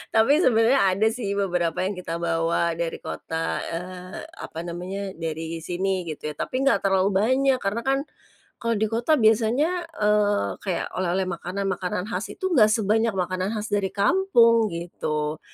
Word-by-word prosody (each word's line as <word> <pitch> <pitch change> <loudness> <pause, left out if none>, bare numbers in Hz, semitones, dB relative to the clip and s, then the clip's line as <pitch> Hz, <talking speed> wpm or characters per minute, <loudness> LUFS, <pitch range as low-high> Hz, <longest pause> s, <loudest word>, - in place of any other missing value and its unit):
Tapi 225 +5 +5
sebenarnya 235 +2 +4 0.2
ada 215 +3 +3
sih 220 -4 -3
beberapa 180 -4 0
yang 195 +2 -2
kita 165 -2 -4
bawa 170 0 0
dari 170 -1 -1
kota, 160 0 -3
eee, 180 +2 -6 0.2
apa 160 - -7
namanya 185 +3 -5
dari 165 0 -4
sini 185 +1 -2
gitu 150 -1 -5
ya, - - -9
tapi 260 +1 -2
nggak 275 - +4
terlalu 195 0 +3
banyak 260 +7 +2
karena 210 +3 -2
kan 270 +2 +2 0.6
kalau 230 0 0
di 220 +1 +1
kota 235 +7 +2
biasanya, 250 +9 +2 0.2
eee, 210 -1 +2
kayak 185 -4 -2
oleh-oleh 185 +1 0
makanan-makanan 185 +1 -3
khas 185 +3 -2
itu 375 -1 -3
nggak 235 -11 +6
sebanyak 220 +1 +2
makanan 185 +3 -1
khas 210 +1 -4
dari 200 -2 +1
kampung 230 - +4
gitu. 155 -3 -3
195 Hz, 155 wpm, -24 LUFS, 175-225 Hz, 0.6 s, nggak